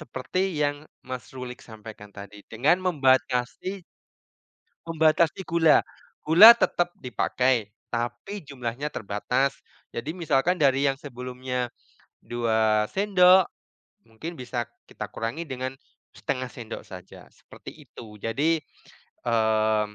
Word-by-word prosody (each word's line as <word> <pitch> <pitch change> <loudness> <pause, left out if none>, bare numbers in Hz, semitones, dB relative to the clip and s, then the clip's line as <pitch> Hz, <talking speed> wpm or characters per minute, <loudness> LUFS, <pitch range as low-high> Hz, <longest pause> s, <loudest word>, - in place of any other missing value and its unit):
seperti 155 +5 -4 0.2
yang, 145 0 -1 0.2
Mas 130 -1 -7
Rulik, 125 -1 -7
sampaikan 110 -2 -12
tadi 100 0 -11
dengan 130 +10 +3
membatasi 135 - +1 1.0
Membatasi 160 +1 +2
gula. 165 -2 +5 0.4
Gula 195 +9 +10
tetap 175 -6 0
dipakai, 125 -3 0 0.2
tapi 120 +11 -4
jumlahnya 135 +1 -5
terbatas. 125 +7 -1 0.3
Jadi 140 +7 -5
misalkan 170 0 +1
dari 140 0 +3
yang 135 - +3
sebelumnya 125 -2 -5 0.5
2 110 -2 +1
sendok 190 -2 +5 0.6
mungkin 135 +10 -8
bisa 120 -2 -4 0.2
kita - - -8
kurangi 115 +8 -4
dengan 130 0 -4 0.4
1/2 130 0 -3
sendok 115 -2 -8
saja, 90 -2 -12
seperti - - -13
itu. 110 -2 -11
Jadi, 150 +8 0 0.7
mmm, 110 -2 +1
130 Hz, 105 wpm, -25 LUFS, 115-155 Hz, 1.0 s, Gula